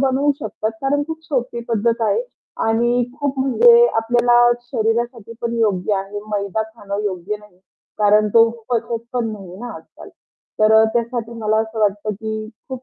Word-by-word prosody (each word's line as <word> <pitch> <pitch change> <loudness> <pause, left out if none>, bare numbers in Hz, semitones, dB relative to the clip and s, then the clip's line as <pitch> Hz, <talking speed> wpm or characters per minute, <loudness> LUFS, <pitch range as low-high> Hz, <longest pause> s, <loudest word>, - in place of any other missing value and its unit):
बनवू 275 +2 +2
शकतात, 220 -4 -3
कारण 285 +2 +1
खूप 320 0 -5
सोपी 250 -6 -2
पद्धत 230 +1 +1
आहे 345 - +1 0.4
आणि 240 +2 +2 0.2
खूप 280 -2 -1
म्हणजे 470 - +6
आपल्याला 240 +1 +3 0.3
शरीरासाठी 230 0 -2
पण 235 0 -2
योग्य 205 -2 +1
आहे. 195 +1 -4
मैदा 200 +1 -1
खाणं 210 -2 -6
योग्य 195 +1 -3
नाही, 210 -3 -20 0.4
कारण 210 0 +4
तो 230 0 +7 0.2
पचत 230 -1 -1
पण 240 -3 -1
नाहीये 190 -3 -9
ना, 245 - -6
आज-काल. - - -14 0.5
तर 215 0 +4
अ, 220 0 +7
त्यासाठी 235 -1 -2
मला 215 0 +1
असं 220 0 -5
वाटतं, 205 0 +1
की 220 +1 -5 0.2
खूप 260 -1 -6
225 Hz, 160 wpm, -20 LUFS, 210-245 Hz, 0.5 s, तो